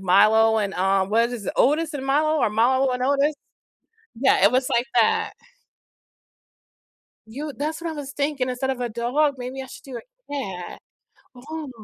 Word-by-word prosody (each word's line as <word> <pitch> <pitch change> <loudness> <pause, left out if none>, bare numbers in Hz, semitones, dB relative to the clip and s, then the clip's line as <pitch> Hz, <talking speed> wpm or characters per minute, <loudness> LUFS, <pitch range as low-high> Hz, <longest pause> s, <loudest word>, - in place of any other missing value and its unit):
Milo 220 +4 +4
and, 200 -2 -1
um, 195 +1 +1
what 230 +2 +2
is 230 -5 -6
it? - - -2
Otis 305 +3 +2
and 270 -1 -5
Milo 310 +3 +2
or - - +2
Milo 255 +5 +2
and 250 0 -3
Otis? 285 +3 +2 0.9
Yeah, 265 -8 +3
it 200 - +7
was 255 0 +1
like 240 +2 +1
that. 225 -2 +2 2.0
You 290 +6 -5
that's 310 +3 -3
what 335 - -3
I - - -5
was 290 -1 -7
thinking, 280 -3 -1
instead 260 +1 -2
of 260 - -2
a 245 - -1
dog, 250 +6 0
maybe 255 +2 -6
I 265 - -7
should - - -12
do 260 -3 -7
a - - -21
cat. 190 -10 -5 0.6
Oh 300 +3 -7
260 Hz, 175 wpm, -23 LUFS, 225-290 Hz, 2.0 s, it